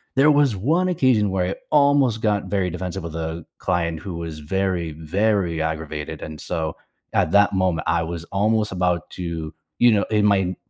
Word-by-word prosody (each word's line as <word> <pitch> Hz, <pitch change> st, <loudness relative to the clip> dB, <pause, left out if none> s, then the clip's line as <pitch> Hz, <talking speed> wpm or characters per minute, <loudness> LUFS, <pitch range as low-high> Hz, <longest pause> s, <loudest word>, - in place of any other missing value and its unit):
there 140 Hz, +3 st, +5 dB
was 145 Hz, -7 st, +3 dB
one 165 Hz, -, +1 dB
occasion 125 Hz, -, +3 dB
where 90 Hz, -2 st, 0 dB
I 95 Hz, -, -2 dB, 0.2 s
almost 140 Hz, -6 st, +4 dB
got 105 Hz, -2 st, +1 dB
very 95 Hz, -3 st, 0 dB
defensive 90 Hz, +2 st, -4 dB
with 80 Hz, -1 st, -6 dB
a 80 Hz, 0 st, -4 dB
client 85 Hz, -3 st, -1 dB
who 95 Hz, -4 st, -6 dB
was 80 Hz, -2 st, -6 dB
very, 90 Hz, 0 st, -1 dB
very 85 Hz, +1 st, 0 dB
aggravated, 80 Hz, -2 st, -4 dB
and 75 Hz, -1 st, -7 dB
so 80 Hz, -3 st, -3 dB, 0.4 s
at 80 Hz, -, +2 dB
that 100 Hz, 0 st, +4 dB
moment, 90 Hz, -4 st, 0 dB
I 85 Hz, 0 st, +2 dB
was 85 Hz, 0 st, -5 dB
almost 105 Hz, +1 st, +1 dB
about 90 Hz, -2 st, 0 dB
to, 85 Hz, -3 st, -5 dB, 0.3 s
you 120 Hz, -1 st, +6 dB
know 100 Hz, -2 st, +3 dB
in 105 Hz, -1 st, +3 dB
my 100 Hz, -1 st, +5 dB
in 90 Hz, -1 st, -1 dB
90 Hz, 185 wpm, -22 LUFS, 80-105 Hz, 0.4 s, you